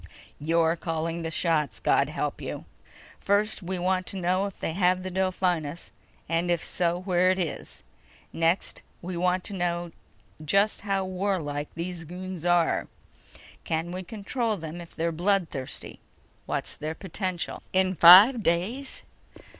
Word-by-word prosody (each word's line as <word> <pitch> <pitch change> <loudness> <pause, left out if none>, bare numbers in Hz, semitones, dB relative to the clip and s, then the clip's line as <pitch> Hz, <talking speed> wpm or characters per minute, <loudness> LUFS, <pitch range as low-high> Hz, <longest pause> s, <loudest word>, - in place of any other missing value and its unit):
You're 165 +2 +2
calling 165 0 -3
the 165 - -3
shots, 160 -4 0
God - - +2
help - - -3
you! - - -6 0.5
First, 210 +2 +1
we 185 +1 -3
want 185 +1 0
to 195 - -4
know 185 +2 +1
if 195 - -11
they 160 - -2
have 180 0 +2
the 185 - -5
Delphinus... 180 -4 -1 0.4
and 165 +1 0
if 175 -2 +1
so, 175 -1 0
where 185 -1 +2
it 185 - +2
is. 170 -5 -5 0.5
Next, 165 +3 +1 0.2
we 180 +1 -4
want 180 +1 +1
to - - -7
know 175 -2 -2 0.5
just 200 +7 +2
how 195 -2 -1
warlike 180 -6 -2
these 170 0 -5
goons 180 0 -6
are. 175 -1 +2 0.8
Can 165 +1 -2
we 185 +1 -4
control 220 +3 -2
them 165 0 -7
if 170 - -13
they're 165 +1 0
bloodthirsty. 170 -6 -2 0.5
What's - - -3
their 155 +1 -5
potential?" 185 -1 -4
"In 185 0 +2
five 195 - +9
days?" 205 +10 -1
180 Hz, 145 wpm, -27 LUFS, 165-190 Hz, 0.8 s, five